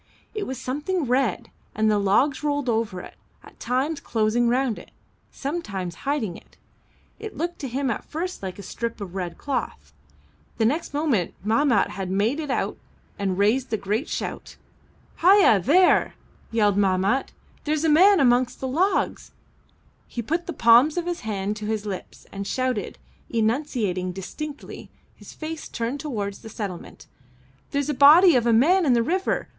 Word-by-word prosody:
It 425 -2 -4
was 260 -1 -5
something 300 +7 -2
red, 250 -4 0 0.2
and 220 +1 +2
the 210 - +2
logs 260 +9 +2
rolled 290 -2 -1
over 220 -5 -1
it, - - -11 0.3
at - - -17
times 265 +6 -1
closing 230 +2 +1
round 250 -1 0
it, - - -14 0.4
sometimes 210 - -4 0.2
hiding 230 -12 -1
it. - - -16 0.6
It 435 -1 -8
looked 345 +2 -3
to 275 - -4
him 260 +1 -1
at 215 - -4
first 360 +4 -5
like 190 -2 -6
a 200 - -9
strip 230 +4 -5
of 195 -4 -7
red 180 -3 -4
cloth. 275 -3 -4 0.6
The 225 - +2
next 290 +4 -1
moment 280 - 0
Mahmat 230 0 +3
had 190 -2 -5
made 210 +10 0
it 300 -2 -4
out 265 - -1 0.4
and 190 -2 -1
raised 225 +6 +1
a - - +2
great 210 +9 -2
shout. - - -5 0.7
"Ah 370 +4 +7
ya! 380 - +5
There!" 355 - +4 0.3
yelled 210 -3 +2
Mahmat. 195 +6 +1 0.3
"There's 305 0 0
a - - +4
man 370 +6 +6
amongst 245 -2 +2
the 265 - -3
logs." 355 +10 0 0.7
He 235 - -5
put 330 +9 -2
the - - -2
palms 245 +3 +5
of 345 - -1
his 350 -1 -3
hand 205 -1 -3
to 215 -1 -5
his 215 -1 -2
lips 195 -3 -7
and 200 0 -5
shouted, 255 -6 -2 0.3
enunciating 220 -6 -1
distinctly, 290 - -8 0.3
his - - -13
face 315 0 -6
turned 235 +5 -3
towards 210 -9 -4
the 225 - -11
settlement: 200 -5 -7 0.6
"There's 280 -1 -1
a 300 - 0
body 300 +5 +7
of 240 -1 +2
a - - +4
man 330 +12 +4
in 255 - +5
the 235 -1 +3
river! 370 +9 -1
245 Hz, 170 wpm, -24 LUFS, 210-300 Hz, 0.7 s, Ah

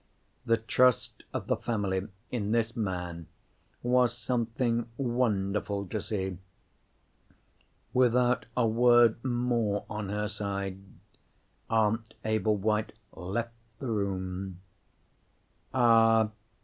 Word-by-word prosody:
The 115 0 +4
trust 125 +3 +2
of - - -3
the - - +1
family 100 -4 -2 0.2
in 110 -3 -1
this 115 -1 +1
man 90 -6 -3 0.6
was 125 -1 +3
something 120 0 -1
wonderful 105 -5 0
to 110 - -2
see. 95 -4 -3 1.5
Without 125 0 +3
a 125 - +4
word 120 0 +5
more, 120 -5 0
on 105 -2 -4
her 105 +1 -1
side, 100 -2 -3 0.9
Aunt 110 0 +1
Ablewhite 110 0 +1 0.2
left 115 +6 -3 0.2
the 130 -4 -4
room. 95 -3 -3 1.1
"Ah!" 115 -3 +5
110 Hz, 95 wpm, -29 LUFS, 100-120 Hz, 1.5 s, word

